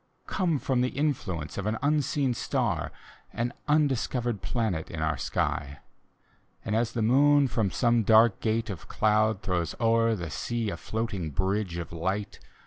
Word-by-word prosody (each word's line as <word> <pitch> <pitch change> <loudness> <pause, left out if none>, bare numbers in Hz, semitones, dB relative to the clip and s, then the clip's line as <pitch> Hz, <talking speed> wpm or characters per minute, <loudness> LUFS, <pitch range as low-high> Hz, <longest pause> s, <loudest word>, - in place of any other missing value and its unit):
Come 175 -5 0
from 130 -2 0
the 125 - +1
influence 105 - -2
of 100 - -3
an 110 +1 0
unseen 145 -2 +1
stafi - - -1 0.4
An 120 +1 -2
undiscovered 130 -7 +1
planet 110 -9 -2
in 80 - -6
our 80 0 0
sky. 70 +1 -2 0.9
And 105 - -1
as 115 0 0
the 115 - 0
moon 140 +4 +5
from 110 -5 0
some 120 +2 +2
dark 110 0 +5
gate 110 0 -1
of 90 - -8
cloud 110 -1 +2
Throws 85 -4 -1
o'er 115 0 +3
the 85 -6 -5
sea 115 +2 -2
a 85 - -5
floating 110 -5 -3
bridge 95 +3 -1
of 85 - -5
light. 95 +5 -3
110 Hz, 155 wpm, -28 LUFS, 95-125 Hz, 0.9 s, moon